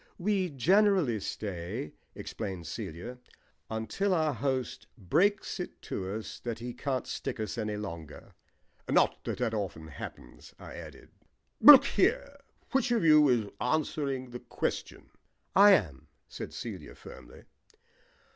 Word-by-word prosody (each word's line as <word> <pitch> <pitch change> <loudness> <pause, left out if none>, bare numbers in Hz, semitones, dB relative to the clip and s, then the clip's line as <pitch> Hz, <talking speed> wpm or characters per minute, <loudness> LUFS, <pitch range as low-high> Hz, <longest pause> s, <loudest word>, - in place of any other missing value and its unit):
"We 190 -1 0
generally 175 - +3
stay," 100 +5 -5 0.2
explained 95 -5 -6
Celia, 85 +11 -6 0.5
"until 145 - -1
our 155 -3 +1
host 130 -3 -2
breaks 175 - +1
it 180 - -6
to 95 +1 -4
us 110 - -7
that 115 -2 -4
he 120 +1 -6
can't 130 -1 -2
stick - - -5
us 110 - -3
any 105 -2 -3
longer." 85 -7 -8 0.6
"Not - - +2
that - - -3
that 120 -3 -1
often 90 -7 -4
happens," 60 -4 -10
I - - -10
added. - - -11 0.5
"Look 290 -3 +10
here, 455 -13 +1 0.3
which 270 -1 +2
of 235 -5 +2
you 155 -2 +7
is 115 -5 +1
answering 135 -2 -1
the 120 - -6
question?" - - -4 0.4
"I 200 +2 +9
am," 75 - 0 0.2
said - - -7
Celia - - -7
firmly. - - -13
125 Hz, 130 wpm, -30 LUFS, -, 0.6 s, Look